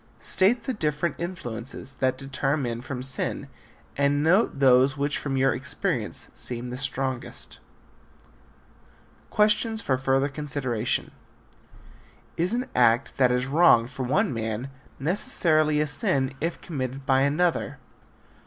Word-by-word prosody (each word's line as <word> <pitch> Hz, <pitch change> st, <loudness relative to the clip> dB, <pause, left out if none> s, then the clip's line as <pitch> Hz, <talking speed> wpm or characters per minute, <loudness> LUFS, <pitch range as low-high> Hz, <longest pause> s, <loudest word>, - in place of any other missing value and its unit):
State 225 Hz, +5 st, +1 dB
the 260 Hz, -, -2 dB
different 155 Hz, -, -1 dB
influences 135 Hz, -7 st, -6 dB
that 130 Hz, -1 st, +1 dB
deter 135 Hz, +1 st, -1 dB
men 120 Hz, -4 st, -3 dB
from 125 Hz, 0 st, -6 dB
sin 130 Hz, -, -2 dB, 0.5 s
and 140 Hz, +1 st, +2 dB
note 180 Hz, +1 st, +3 dB
those 135 Hz, 0 st, +4 dB
which 140 Hz, +1 st, -1 dB
from 135 Hz, -2 st, -2 dB
your 135 Hz, 0 st, +3 dB
experience 140 Hz, -, -2 dB
seem 120 Hz, 0 st, -4 dB
the -, -, -4 dB
strongest. 130 Hz, -1 st, -4 dB, 1.7 s
Questions 215 Hz, +1 st, +2 dB
for 130 Hz, -, 0 dB
Further 135 Hz, +1 st, +2 dB
Consideration. 135 Hz, -5 st, -2 dB, 1.2 s
Is 180 Hz, +7 st, 0 dB
an 250 Hz, +2 st, -1 dB
act 120 Hz, +1 st, +2 dB
that 125 Hz, -2 st, +4 dB
is 125 Hz, 0 st, +1 dB
wrong 135 Hz, -5 st, +5 dB
for 130 Hz, +2 st, -8 dB
one 150 Hz, -, +1 dB
man 115 Hz, +3 st, -4 dB, 0.3 s
necessarily 155 Hz, -1 st, +2 dB
a 150 Hz, -, +2 dB
sin 135 Hz, -2 st, +1 dB
if 165 Hz, +2 st, -2 dB
committed 135 Hz, -3 st, -5 dB
by 135 Hz, -1 st, +3 dB
another? 145 Hz, +1 st, +1 dB
135 Hz, 125 wpm, -25 LUFS, 130-155 Hz, 1.7 s, wrong